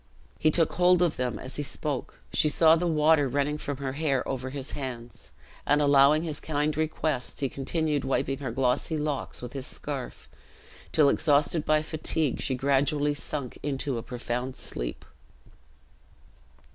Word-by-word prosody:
He 155 Hz, -, +4 dB
took 165 Hz, 0 st, +2 dB
hold 180 Hz, 0 st, +4 dB
of 170 Hz, -, +1 dB
them 125 Hz, -2 st, -1 dB
as 130 Hz, -, -6 dB
he -, -, 0 dB
spoke. 145 Hz, -1 st, -3 dB
She 155 Hz, -, +3 dB
saw 160 Hz, +1 st, +5 dB
the 175 Hz, +1 st, 0 dB
water 155 Hz, -2 st, +4 dB
running 145 Hz, +3 st, -1 dB
from 145 Hz, -2 st, -4 dB
her 135 Hz, -1 st, -3 dB
hair 140 Hz, -3 st, 0 dB
over 130 Hz, -1 st, -3 dB
his 140 Hz, +1 st, -5 dB
hands, 125 Hz, -4 st, -7 dB, 0.3 s
and 145 Hz, +1 st, +3 dB
allowing 145 Hz, +1 st, +5 dB
his 155 Hz, -3 st, -3 dB
kind 150 Hz, 0 st, -1 dB
request, 155 Hz, -3 st, -1 dB
he 140 Hz, -, +1 dB
continued 145 Hz, +2 st, -1 dB
wiping 135 Hz, 0 st, -1 dB
her 140 Hz, -, -4 dB
glossy 130 Hz, +5 st, 0 dB
locks 150 Hz, -4 st, -3 dB
with 125 Hz, -, -7 dB
his 135 Hz, -1 st, -5 dB
scarf, 140 Hz, -4 st, -6 dB, 0.6 s
till, 150 Hz, -2 st, +4 dB
exhausted 150 Hz, +2 st, +2 dB
by 155 Hz, 0 st, +3 dB
fatigue, 155 Hz, -2 st, -1 dB
she 130 Hz, -, 0 dB
gradually 145 Hz, +2 st, +1 dB
sunk 145 Hz, -3 st, -5 dB
into 135 Hz, -3 st, -2 dB
a -, -, -5 dB
profound 125 Hz, +2 st, -4 dB
sleep. -, -, -5 dB
145 Hz, 160 wpm, -27 LUFS, 130-155 Hz, 0.6 s, saw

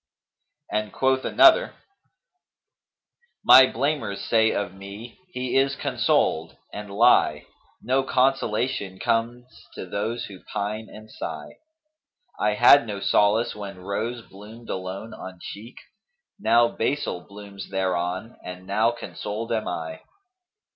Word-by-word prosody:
And 105 Hz, -1 st, -1 dB
quoth 130 Hz, +3 st, +1 dB
another, 345 Hz, +9 st, +5 dB, 1.7 s
'My 130 Hz, 0 st, +9 dB
blamers 125 Hz, -5 st, -1 dB
say 110 Hz, -1 st, +3 dB
of 100 Hz, -3 st, -3 dB
me, 100 Hz, -, -10 dB
'He 125 Hz, -7 st, -4 dB
is 135 Hz, 0 st, +3 dB
consoled,' 125 Hz, -, 0 dB, 0.2 s
And 105 Hz, 0 st, -7 dB
lie! 100 Hz, -, +3 dB, 0.2 s
* -, -, -37 dB
No 130 Hz, +3 st, +2 dB
consolation 125 Hz, -6 st, 0 dB
comes 115 Hz, +4 st, -1 dB, 0.3 s
to -, -, -6 dB
those 110 Hz, +6 st, -3 dB
who 95 Hz, -3 st, -12 dB
pine 105 Hz, +1 st, -3 dB
and 110 Hz, 0 st, -13 dB
sigh. -, -, -7 dB, 0.8 s
I 105 Hz, 0 st, +1 dB
had 120 Hz, +2 st, +7 dB
no 100 Hz, -2 st, -4 dB
solace 105 Hz, +3 st, +2 dB
when 100 Hz, -2 st, -8 dB
Rose 110 Hz, +6 st, -4 dB
bloomed 110 Hz, +4 st, -11 dB
alone 95 Hz, +4 st, -5 dB
on 95 Hz, -2 st, -9 dB
cheek, 110 Hz, +7 st, -9 dB, 0.4 s
* -, -, -49 dB, 0.2 s
Now 115 Hz, +2 st, +4 dB
Basil 115 Hz, -7 st, -2 dB
blooms 100 Hz, -1 st, -10 dB
thereon 95 Hz, +2 st, -2 dB
and 90 Hz, 0 st, -8 dB
now 110 Hz, +4 st, +2 dB
consoled 115 Hz, -1 st, -6 dB
am 110 Hz, -2 st, -1 dB
I.' 80 Hz, -2 st, -5 dB
110 Hz, 125 wpm, -24 LUFS, 100-120 Hz, 1.7 s, My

